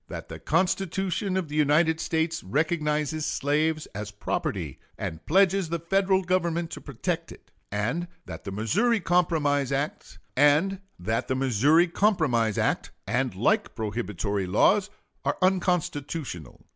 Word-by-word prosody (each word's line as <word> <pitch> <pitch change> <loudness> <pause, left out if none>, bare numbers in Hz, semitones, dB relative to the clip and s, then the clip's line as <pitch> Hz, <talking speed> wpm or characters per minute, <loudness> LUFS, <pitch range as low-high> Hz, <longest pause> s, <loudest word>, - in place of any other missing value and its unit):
That - - -7
the - - -7
Constitution 190 +1 0
of 185 -4 -1
the 150 - -6
United 155 +2 +3
States 165 0 -1
recognizes 150 - 0
slaves 155 +3 0
as 105 0 -5
property, 105 0 -3 0.2
and 80 0 -5
pledges 190 0 +3
the 170 - -1
Federal 190 +3 +2
Government 170 -2 0
to - - -7
protect 165 +6 -3
it; - - -15 0.2
and 115 - -1 0.2
that 80 -2 -8
the 100 - -5
Missouri 195 - +1
Compromise 155 -6 +1
act 140 +3 -2 0.3
and 150 +8 +4 2.6
like 210 - +1
prohibitory 105 -3 -2
laws 195 - +3 0.3
are - - 0
unconstitutional. 165 - -1
160 Hz, 110 wpm, -26 LUFS, 135-185 Hz, 2.6 s, and